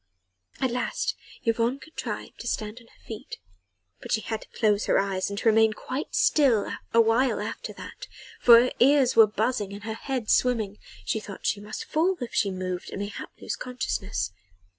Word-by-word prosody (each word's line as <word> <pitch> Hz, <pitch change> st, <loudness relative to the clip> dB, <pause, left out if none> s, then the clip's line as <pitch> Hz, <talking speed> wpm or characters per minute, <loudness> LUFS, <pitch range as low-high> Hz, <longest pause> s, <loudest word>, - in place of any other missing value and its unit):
At 260 Hz, -2 st, +1 dB
last 250 Hz, -, -1 dB, 0.3 s
Yvonne 230 Hz, +3 st, +1 dB
contrived 315 Hz, +3 st, -7 dB
to -, -, -6 dB
stand 215 Hz, +2 st, -3 dB
on 230 Hz, -, -19 dB
her -, -, -25 dB
feet; 220 Hz, -2 st, -7 dB, 0.6 s
but -, -, -8 dB
she 220 Hz, -, +2 dB
had 220 Hz, -1 st, -4 dB
to -, -, -14 dB
close 210 Hz, -2 st, +3 dB
her -, -, +3 dB
eyes 195 Hz, -1 st, 0 dB
and 200 Hz, -, -5 dB
to 230 Hz, -, -1 dB
remain 220 Hz, 0 st, +5 dB
quite 260 Hz, +6 st, -5 dB
still 260 Hz, -9 st, +4 dB
for -, -, -4 dB
awhile 230 Hz, +3 st, +4 dB
after -, -, -5 dB
that, -, -, -9 dB, 0.3 s
for 235 Hz, -1 st, +9 dB
her 250 Hz, +2 st, +2 dB
ears 270 Hz, 0 st, +5 dB
were 225 Hz, -1 st, +8 dB
buzzing 210 Hz, -1 st, -1 dB
and 200 Hz, 0 st, -8 dB
her 220 Hz, 0 st, -3 dB
head 250 Hz, 0 st, -3 dB
swimming: 220 Hz, -5 st, +2 dB, 0.3 s
she 160 Hz, -, 0 dB
thought 205 Hz, -2 st, -9 dB
that -, -, -12 dB
she 205 Hz, -, +1 dB
must 210 Hz, +1 st, -6 dB
fall 350 Hz, +4 st, +1 dB
if 245 Hz, -3 st, -5 dB
she 200 Hz, -, +2 dB
moved 185 Hz, -1 st, -4 dB
and -, -, -6 dB
mayhap 205 Hz, +1 st, -5 dB
lose -, -, -3 dB
consciousness. 100 Hz, -, -3 dB
225 Hz, 190 wpm, -26 LUFS, 205-250 Hz, 0.6 s, for